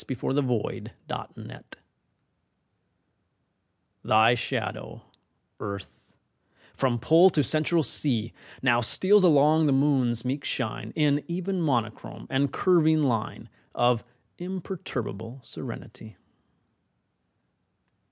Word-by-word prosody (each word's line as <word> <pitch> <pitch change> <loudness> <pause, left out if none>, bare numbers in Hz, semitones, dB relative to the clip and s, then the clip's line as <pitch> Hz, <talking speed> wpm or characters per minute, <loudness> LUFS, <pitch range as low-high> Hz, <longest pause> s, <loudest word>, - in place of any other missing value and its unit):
AT 130 -3 -7
A - - -3
LUNAR 130 -5 -1 0.2
ECLIPSE - - -9 2.3
THY 110 +2 +5
shadow, 120 - -4 0.6
Earth, 100 -2 -8 0.6
from 130 -3 0
Pole 160 +10 +5
to 150 -5 +1
Central 155 +4 +1
Sea, 115 -4 -1 0.3
Now 120 -2 +3
steals 190 - +3
along 155 -1 +4
upon - - +3
the 140 - +3
Moon's 130 -4 +1
meek 135 +3 -2
shine 120 -5 -4
In 145 -2 +2
even 185 +2 -3
monochrome 120 -8 -2
and 135 0 +1
curving 160 -3 +3
line 115 -5 -2 0.3
Of 120 -1 +2 0.4
imperturbable 135 - -6
serenity. 115 -3 -10
135 Hz, 95 wpm, -26 LUFS, 120-155 Hz, 2.3 s, THY